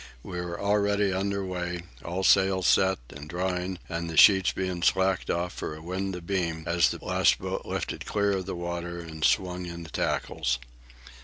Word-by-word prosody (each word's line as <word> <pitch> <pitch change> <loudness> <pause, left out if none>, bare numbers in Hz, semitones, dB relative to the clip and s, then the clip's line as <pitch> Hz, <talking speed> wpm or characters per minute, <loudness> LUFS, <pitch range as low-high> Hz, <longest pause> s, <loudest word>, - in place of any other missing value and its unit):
We 90 -2 -5
were 85 -1 -5
already 100 -1 +2
under 100 +1 -1
way, 90 -1 -3 0.2
all 90 +3 -3
sails 95 -1 +4
set 95 +1 +4
and 70 +2 -10
drawing, 90 +1 -2
and 85 0 -3
the 80 - -5
sheets 95 +1 +7
being 95 -2 -3
slacked 95 +1 +2
off 85 +1 -1
for 75 - -5
a 80 - -11
wind 95 +2 -3
abeam, 85 -2 -2
as 85 0 +3
the - - -6
last - - +3
boat - - -4
lifted - - -4
clear 100 -1 +1
of 95 -2 -2
the 95 - -3
water 85 0 -4
and 80 -2 -7
swung 90 0 +1
in 85 0 -7
the 80 - -11
tackles. 60 -2 -1
90 Hz, 180 wpm, -27 LUFS, 85-95 Hz, 0.2 s, sheets